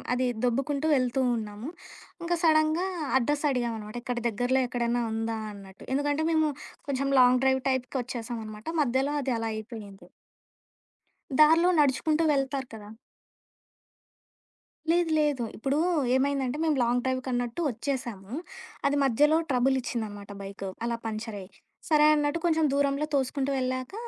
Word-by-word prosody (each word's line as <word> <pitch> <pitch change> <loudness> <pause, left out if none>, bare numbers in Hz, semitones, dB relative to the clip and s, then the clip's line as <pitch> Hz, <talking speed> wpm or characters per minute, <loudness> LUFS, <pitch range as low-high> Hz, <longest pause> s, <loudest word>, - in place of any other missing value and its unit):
అది 255 0 +1 0.2
దొబ్బుకుంటూ 275 +5 0
వెళ్తూ 255 0 +1
ఉన్నాము. 215 +4 -6 0.6
ఇంకా 345 0 +1
సడన్‌గా 315 +3 +3 0.3
అడ్రస్ 290 +4 0
అడిగాం 240 -3 -1
అనమాట. 210 +1 -9
ఇక్కడ 245 -2 -2
దగ్గరలో 245 +4 +1
ఎక్కడైనా 240 -1 0
ఉందా? 225 0 -2 0.2
అన్నట్టు. 195 -1 -13
ఎందుకంటే 290 +2 0
మేము 315 -1 +3 0.4
కొంచెం 275 0 0
లాంగ్ 250 +1 +5
డ్రైవ్ 265 0 +3
టైప్‌కి 260 0 -1
వచ్చేసాం 235 -1 -5
అనమాట. 215 0 -10
మధ్యలో 270 +2 +1
అది 260 -2 -1
అలా 225 0 -2
అయిపోయింది. 215 -3 -9 1.3
దారిలో 325 +3 +6
నడుచుకుంటూ 300 +3 +2
వెళ్తారు 270 -1 -1
కదా! 210 -2 -9 2.0
లేదు 345 -1 +2
లేదు. 290 -5 +1
ఇప్పుడు 270 +5 0 0.4
ఏమైందంటే, 270 0 0
మేము 310 - +2
లాంగ్ 245 +1 +1
డ్రైవ్‌కన్నట్టు 255 +1 -2
వచ్చేసాము. 235 -4 -4 0.5
అది 285 - +1
మధ్యలో 295 +6 +4
ట్రబులిచ్చిందనమాట 240 -6 -1
బైకు. 195 0 -6 0.2
అలా 235 0 -1
పంచరయ్యి, 215 -3 -5 0.4
సరే 305 -1 +4
అన్నట్టు 295 +2 0
కొంచెం 320 -2 +3
దూరంలో 280 +1 +1
తోసుకుంటూ 275 0 0
వెళ్ళాక 255 +3 -2
260 Hz, 125 wpm, -27 LUFS, 235-285 Hz, 2.0 s, దారిలో